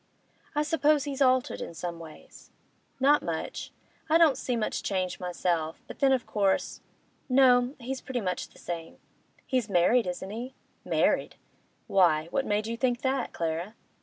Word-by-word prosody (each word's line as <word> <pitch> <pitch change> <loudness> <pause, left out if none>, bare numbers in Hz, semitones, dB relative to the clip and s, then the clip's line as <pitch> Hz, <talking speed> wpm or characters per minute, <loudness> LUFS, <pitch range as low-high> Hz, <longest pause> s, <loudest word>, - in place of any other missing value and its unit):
'I 295 - +2
suppose 300 -1 +2
he's 285 -1 -4
altered 255 -1 +2
in 170 - -6
some 170 +1 -5
ways?' 160 -2 -13 0.5
'Not 285 +3 +5
much; 165 -1 -4 0.4
I 320 - +6
don't 325 -5 +5
see 250 - -2
much 225 -2 -1
change, 185 -2 -2
myself, 175 -3 -1
but - - -11
then 275 -1 +4
of 260 -3 +1
course— 200 -2 0 0.5
No, 255 0 +5
he's 260 +2 -5
pretty 255 -2 -3
much 185 -3 -2
the - - -20
same.' 165 -2 -6 0.5
'He's 255 -5 -1
married, 195 +5 +3
isn't 180 +2 -4
he? 245 +4 -6 0.3
'Married? - - +1 0.5
Why, 165 -4 +3
what 270 - 0
made 210 +1 0
you 230 +1 -3
think 245 0 0
that. 265 -2 0
Clara? 170 +6 -3
230 Hz, 160 wpm, -28 LUFS, 180-265 Hz, 0.5 s, I